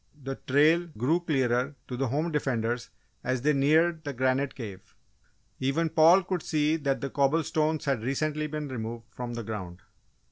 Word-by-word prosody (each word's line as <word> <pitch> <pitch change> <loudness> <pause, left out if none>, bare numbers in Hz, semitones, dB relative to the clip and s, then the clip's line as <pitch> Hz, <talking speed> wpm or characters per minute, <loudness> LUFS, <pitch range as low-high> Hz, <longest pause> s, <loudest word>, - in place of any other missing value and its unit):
The 135 +1 -3
trail 155 +6 +4
grew 140 +10 +2
clearer 135 -4 0
to 125 - -4
the 135 +2 -1
"home 150 +7 -1
defenders" 120 -5 -1 0.3
as 130 -1 -1
they 150 +1 +4
neared 160 +4 +3
the 145 - -4
granite 130 +2 0
cave; 100 -6 -9 0.6
even 150 +5 +1
Paul 165 +5 +6
could 185 -2 -2
see 150 0 +1
that 140 -2 -1
cobble 145 +4 +2
stones 155 +1 0
had 135 -5 0
recently 150 +5 -1
been 150 0 -4
removed 115 -2 -5
from 120 -1 -5
the 120 - -4
ground. 95 -5 -6
140 Hz, 165 wpm, -28 LUFS, 125-155 Hz, 0.6 s, Paul